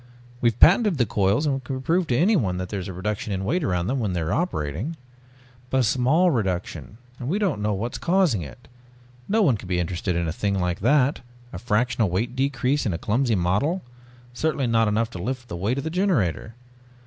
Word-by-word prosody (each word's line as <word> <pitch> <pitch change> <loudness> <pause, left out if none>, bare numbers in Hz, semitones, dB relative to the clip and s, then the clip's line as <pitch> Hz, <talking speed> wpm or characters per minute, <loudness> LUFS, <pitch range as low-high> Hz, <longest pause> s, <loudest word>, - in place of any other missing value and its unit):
We've 120 -1 +1
patented 195 0 +5
the 120 - +3
coils 100 +7 +1
and 135 -2 -1
can 130 +2 -4
prove 170 +4 +1
to 120 - +1
anyone 150 - +2
that 90 0 -4
there 100 - -3
is 95 - -6
a - - -5
reduction 105 +3 -3
in 95 0 -2
weight 165 - 0
around 90 -5 0
them 130 +7 -1
when 105 -6 -1
they 90 - -1
are 80 +4 -1
operating...." 130 - -2 0.7
"But 130 +1 +2
a - - +2
small 135 - +3
reduction. 100 - -3 0.2
And 125 - -4
we 185 - +1
don't 190 - 0
know 105 0 0
what 115 +5 -3
is - - -4
causing 170 - +2
it. 85 - -11 0.6
No 220 +2 +3
one 135 - +3
can 100 - -11
be 90 -1 0
interested 90 +1 -2
in 85 -1 -1
a 80 - -2
thing 100 +1 -1
like 90 -1 -1
that 135 +5 +2 0.3
a - - -5
fractional 115 -2 +1
weight 115 +8 -2
decrease 135 +1 0
in 95 - -1
a - - -2
clumsy 115 +5 +1
model, 100 - 0 0.5
certainly 145 0 -1
not 115 -1 +2
enough 110 +2 0
to 90 - -7
lift 125 +3 -4
the 105 - -5
weight 100 +9 -1
of 140 - -2
the 160 - -3
generator. 140 - 0
115 Hz, 220 wpm, -24 LUFS, 95-145 Hz, 0.7 s, patented